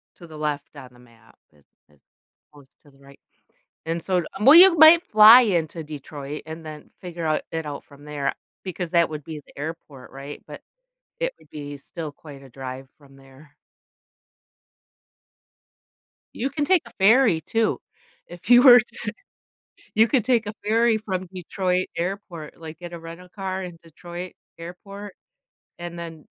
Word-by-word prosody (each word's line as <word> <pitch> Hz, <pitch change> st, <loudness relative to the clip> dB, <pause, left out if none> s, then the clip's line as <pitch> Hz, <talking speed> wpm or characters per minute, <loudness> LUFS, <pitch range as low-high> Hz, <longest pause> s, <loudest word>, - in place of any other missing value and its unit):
to 175 Hz, -, -14 dB
the 155 Hz, -1 st, -11 dB
left 150 Hz, -1 st, -4 dB
on 130 Hz, -3 st, -11 dB
the 120 Hz, -, -20 dB
map. 115 Hz, -2 st, -22 dB
It 75 Hz, -2 st, -28 dB, 0.2 s
it's 75 Hz, -2 st, -29 dB, 0.5 s
close 140 Hz, -2 st, -18 dB
to 145 Hz, -, -21 dB
the 135 Hz, -, -25 dB
right 140 Hz, 0 st, -18 dB, 0.7 s
And 165 Hz, +1 st, -3 dB
so 185 Hz, -1 st, 0 dB
um, 195 Hz, +4 st, -4 dB
well, 275 Hz, +4 st, +10 dB
you've 355 Hz, 0 st, +9 dB
might 320 Hz, +2 st, +8 dB
fly 215 Hz, +3 st, +8 dB
into 170 Hz, -, -1 dB
Detroit 145 Hz, -1 st, -8 dB
and 160 Hz, +1 st, -9 dB
then 155 Hz, -1 st, -10 dB
figure 175 Hz, -2 st, -6 dB
out 155 Hz, -1 st, 0 dB
it 160 Hz, -1 st, -4 dB
out 145 Hz, -1 st, -6 dB
from 145 Hz, +1 st, -17 dB
there 150 Hz, -2 st, -3 dB, 0.3 s
because 180 Hz, -2 st, -5 dB
that 170 Hz, -1 st, +3 dB
would 150 Hz, -1 st, -7 dB
be 155 Hz, 0 st, -8 dB
the -, -, -21 dB
airport, 150 Hz, -4 st, -8 dB
right? 140 Hz, +2 st, -9 dB
But -, -, -10 dB, 0.6 s
it -, -, -1 dB
would -, -, -23 dB
be 145 Hz, -1 st, -8 dB
still 155 Hz, +3 st, -8 dB
quite 145 Hz, -2 st, -13 dB
a 135 Hz, -, -14 dB
drive 130 Hz, +1 st, -8 dB
from 140 Hz, -2 st, -20 dB
there. 135 Hz, +2 st, -19 dB, 2.8 s
You 265 Hz, -, -2 dB
can 290 Hz, +1 st, -2 dB
take 365 Hz, +1 st, +3 dB
a 235 Hz, -, -14 dB
ferry 215 Hz, -3 st, +4 dB
too. 225 Hz, +4 st, -1 dB, 0.5 s
If 175 Hz, +3 st, -12 dB
you 245 Hz, 0 st, +8 dB
were 245 Hz, -3 st, +10 dB
to 225 Hz, 0 st, -8 dB, 0.9 s
you 220 Hz, +2 st, +5 dB
could 245 Hz, -3 st, +1 dB
take 245 Hz, -3 st, +2 dB
a 210 Hz, -, -4 dB
ferry 225 Hz, +1 st, +3 dB
from 185 Hz, -4 st, -4 dB
Detroit 185 Hz, 0 st, -2 dB
Airport 175 Hz, -3 st, -5 dB
like, 160 Hz, -1 st, -10 dB
get 175 Hz, -1 st, -9 dB
a 170 Hz, -, -7 dB
rental 165 Hz, +2 st, -11 dB
car 190 Hz, 0 st, -5 dB
in 175 Hz, -2 st, -9 dB
Detroit 175 Hz, +2 st, -9 dB, 0.2 s
Airport, 195 Hz, +4 st, -10 dB, 0.6 s
and 175 Hz, 0 st, -7 dB
then 165 Hz, -2 st, -9 dB
170 Hz, 170 wpm, -23 LUFS, 150-200 Hz, 2.8 s, well